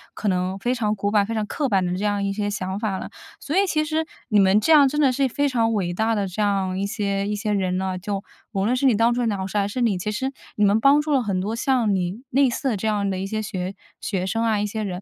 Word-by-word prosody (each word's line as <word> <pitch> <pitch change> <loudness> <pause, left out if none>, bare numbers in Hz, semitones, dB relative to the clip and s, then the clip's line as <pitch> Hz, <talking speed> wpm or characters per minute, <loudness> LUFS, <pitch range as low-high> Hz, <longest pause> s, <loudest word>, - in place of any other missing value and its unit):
可 215 - -3
能 185 +1 -1
非 245 +4 0
常 215 -3 0
古 205 0 -1
板、 205 -1 +3
非 225 - -4
常 215 -1 -1
刻 280 +4 -2
板 190 -3 +2
的 180 0 -1
这 200 - -4
样 205 -1 0
一 195 - -1
些 205 0 -2
想 190 0 -3
法 205 -4 -1
了。 - - -7 0.3
所 300 - -4
以 400 - +4
其 305 -2 +1
实 315 +1 -1 0.2
你 210 -2 +4
们 195 +2 +5
这 320 +9 +3
样 285 -2 +7
真 295 +3 -2
的 270 - +4
是 270 +1 +1
非 285 +4 0
常 230 -3 +1
伟 180 -4 -1
大 220 +4 +1
的 200 -2 -1
这 185 +4 -4
样 195 -2 0
一 200 - 0
些 200 -2 -2
一 210 - -1
些 210 0 -2
人 185 -2 0
呢， 190 -1 -2
就 200 +1 -4 0.3
无 195 0 0
论 245 - +2
是 265 +2 0
你 235 - +4
当 230 +2 +3
初 245 - -1
的 235 - +1
老 190 -1 -3
师 205 - -3
还 200 0 +1
是 245 +5 -3
你， 220 -5 +2
其 210 - -2
实 265 +5 -2 0.2
你 210 - +3
们 205 +2 +3
帮 280 +4 +5
助 300 - -3
了 270 -3 +3
很 195 -3 -1
多 215 +4 -2
像 235 -4 +1
你 185 +5 -2
类 270 0 +4
似 265 +3 -2
的 215 - -1
这 220 - -2
样 205 -2 0
的 185 -1 -2
一 195 - -3
些 215 +1 -2
学 190 -2 -4 0.3
学 185 -3 -2
生 225 +5 -1
啊， 220 -2 +1
一 210 - 0
些 220 +1 -4
人。 185 -2 -4
210 Hz, 325 characters per minute, -23 LUFS, 195-240 Hz, 0.3 s, 样